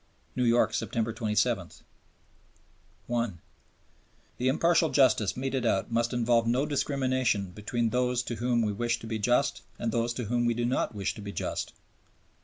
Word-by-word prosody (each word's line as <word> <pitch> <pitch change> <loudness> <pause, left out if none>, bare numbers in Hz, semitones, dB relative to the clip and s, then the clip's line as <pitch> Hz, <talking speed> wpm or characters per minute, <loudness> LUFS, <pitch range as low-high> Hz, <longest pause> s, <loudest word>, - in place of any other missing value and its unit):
New 125 - +1
York, 120 0 +3
September 115 -1 -1
27. 105 -2 0 1.4
(1) 115 -7 -2 1.0
"The 125 - 0
impartial 165 +4 +3
justice 120 -7 +3
meted 130 -1 -1
out 105 -2 0
must 115 +1 +1
involve 120 -1 +2
no 125 +4 +2
discrimination 130 -8 0
between 110 +4 -2
those 125 0 +1
to 120 -1 -5
whom 120 0 +1
we 105 - 0
wish 120 +3 0
to 115 - -11
be 110 -1 -3
just 125 +6 +1 0.2
and 115 - -2
those 115 +1 0
to 125 - -3
whom 120 +2 0
we 120 -1 +1
do 120 0 -1
not 120 -2 0
wish 100 -2 -2
to - - -10
be 100 0 -6
just." - - -4
120 Hz, 165 wpm, -28 LUFS, 110-125 Hz, 1.4 s, York